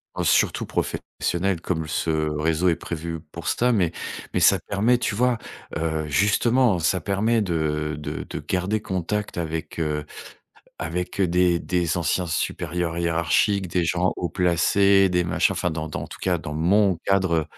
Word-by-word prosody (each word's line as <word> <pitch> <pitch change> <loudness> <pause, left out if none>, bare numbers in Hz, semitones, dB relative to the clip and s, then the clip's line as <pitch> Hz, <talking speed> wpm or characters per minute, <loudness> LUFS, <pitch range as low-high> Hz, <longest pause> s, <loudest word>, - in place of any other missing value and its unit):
Oh, - - -2
c'est - - +4
surtout - - 0
profes - - -2 0.3
sionnel, 90 0 0
comme 80 -3 -2
ce 80 - -2
réseau 80 +2 +1
est 85 - +2
prévu 85 0 -5
pour 85 -3 -7
ça. 125 +10 +2
Mais 95 -8 +2 0.4
mais - - +1
ça - - +6
permet, 110 +5 +1
tu 120 - -1
vois, 125 +1 +2 0.4
heu, 80 -1 -2
justement, 105 - +3
ça 85 +2 +1
permet 110 +5 +1
de 75 -5 -1
de 75 0 -5
de - - -6
garder 95 +4 -1
contact 95 +2 -3
avec, 80 0 -4
heu 75 -2 -1 0.7
avec, 90 +4 -3
heu, 95 - +3
des 90 0 +3
des 90 -2 0
anciens 85 +2 0
supérieurs 85 +1 -2
hiérarchiques, 85 +4 +1
des 85 0 0
gens 90 +2 +1
haut 90 - -2
placés, 95 +3 +3
des 90 -1 +1
machins 85 - +2
Enfin, 90 - -1
dans 80 0 -4
dans 75 - -5
en - - -5
tout - - -10
cas, 90 -2 +1
dans 75 -2 -6
mon 95 +4 +3
cadre, 95 -3 +2
heu 80 - +1
85 Hz, 180 wpm, -24 LUFS, 80-95 Hz, 0.7 s, ça